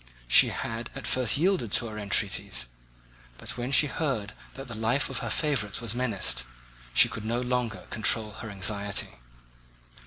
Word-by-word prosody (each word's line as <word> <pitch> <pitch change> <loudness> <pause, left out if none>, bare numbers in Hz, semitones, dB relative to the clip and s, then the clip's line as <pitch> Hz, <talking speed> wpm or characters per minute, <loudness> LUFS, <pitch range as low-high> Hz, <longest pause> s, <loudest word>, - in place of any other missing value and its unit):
She - - +8
had 115 +1 -4
at 135 - -6
first 130 0 +2
yielded 170 - +1
to 120 - +4
our 110 -1 -6
entreaties, 100 -10 0 0.7
but - - -6
when 125 +2 -3
she 140 +2 +7
heard 135 -9 -2 0.2
that 135 0 -8
the 120 - -7
life 115 +5 0
of - - -2
her - - -4
favourite 135 -10 0
was 115 -3 -2
menaced, 115 - 0 0.5
she - - +6
could 110 - -6
no 115 +2 -1
longer 125 -2 -2
control 110 0 +1
her 110 +2 -8
anxiety. 100 - -2
115 Hz, 160 wpm, -28 LUFS, 105-130 Hz, 0.7 s, She